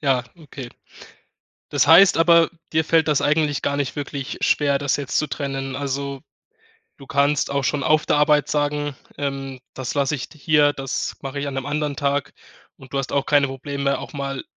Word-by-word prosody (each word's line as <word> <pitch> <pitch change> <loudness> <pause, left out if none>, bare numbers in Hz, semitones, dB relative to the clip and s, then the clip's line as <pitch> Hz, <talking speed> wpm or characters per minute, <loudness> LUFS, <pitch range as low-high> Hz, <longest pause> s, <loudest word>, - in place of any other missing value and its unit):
Ja, 130 -3 +2
okay. 140 -6 -9 1.0
Das - - +2
heißt 175 +5 +7
aber, 165 0 +5 0.2
dir 160 0 +3
fällt 160 0 +3
das 150 -3 +2
eigentlich 150 -1 +1
gar 140 - -1
nicht 140 -2 -2
wirklich 140 -1 -5
schwer, 140 -2 +2
das 140 0 0
jetzt 140 -2 -2
zu 150 - +1
trennen? 135 -2 -4
Also, 140 0 -3 0.8
du 135 - -14
kannst 140 0 +1
auch 140 0 0
schon 140 +1 0
auf 155 0 +3
der - - +2
Arbeit 150 0 +3
sagen, 145 -1 -1 0.2
ähm: 135 -2 -4
„Das 130 -2 -4
lasse 140 0 +1
ich 135 - -6
d - - -17
hier, 150 0 +3
das 135 -2 -3
mache 140 0 -5
ich 145 - -3
an 140 - -4
'nem 135 -1 -3
anderen 145 0 -2
Tag." 140 0 -1 0.4
Und 130 0 -15
du - - 0
hast 135 -1 -3
auch 140 - 0
keine 145 -1 +3
Probleme, 140 +1 -2
auch - - -9
mal 140 -1 -4
140 Hz, 195 wpm, -22 LUFS, 135-150 Hz, 1.0 s, heißt